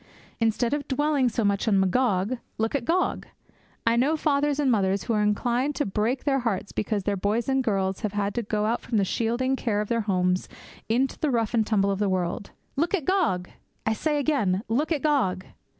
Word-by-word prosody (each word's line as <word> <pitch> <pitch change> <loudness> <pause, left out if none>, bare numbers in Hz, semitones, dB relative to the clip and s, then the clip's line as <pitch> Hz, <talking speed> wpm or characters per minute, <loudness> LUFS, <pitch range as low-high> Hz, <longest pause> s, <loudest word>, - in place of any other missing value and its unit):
Instead 230 +2 +1
of 290 -1 -2
dwelling 290 -2 +2
so 230 -1 -1
much 200 +2 +1
on 200 -3 +4
Magog, 200 +3 +1 0.2
look 225 +1 -1
at 275 -5 -1
Gog. 360 +6 0 0.6
I 230 0 +3
know 280 +7 +2
fathers 290 -1 +1
and 275 -3 +3
mothers 195 -3 +1
who 230 - -1
are 210 - +2
inclined 240 +7 0
to 295 - 0
break 215 +6 -1
their 275 -2 +2
hearts 210 -5 -2
because 210 -1 -2
their 205 +1 0
boys 210 +4 -1
and 265 -1 +1
girls 195 -4 0
have 210 -2 -3
had 205 -1 -1
to 240 - -1
go 210 -1 -1
out 230 +2 0
from 225 - -2
the 200 - +3
shielding 240 +6 0
care 225 -5 -1
of 210 - -3
their 230 -1 +1
homes 185 -3 0 0.4
into 255 +4 +1
the 305 - +1
rough 230 -4 0
and 220 -2 +2
tumble 200 -2 +2
of 195 - -2
the 210 - +2
great 190 - +1
world. 180 +2 -2 0.3
Look 330 +7 +1
at 325 -8 -4
Gog, 325 - +1 0.3
I 220 - +2
say 300 +6 0
again, 235 -10 +1
look 280 +9 0
at 300 -4 0
Gog! 215 -12 +1
230 Hz, 215 wpm, -26 LUFS, 200-270 Hz, 0.6 s, on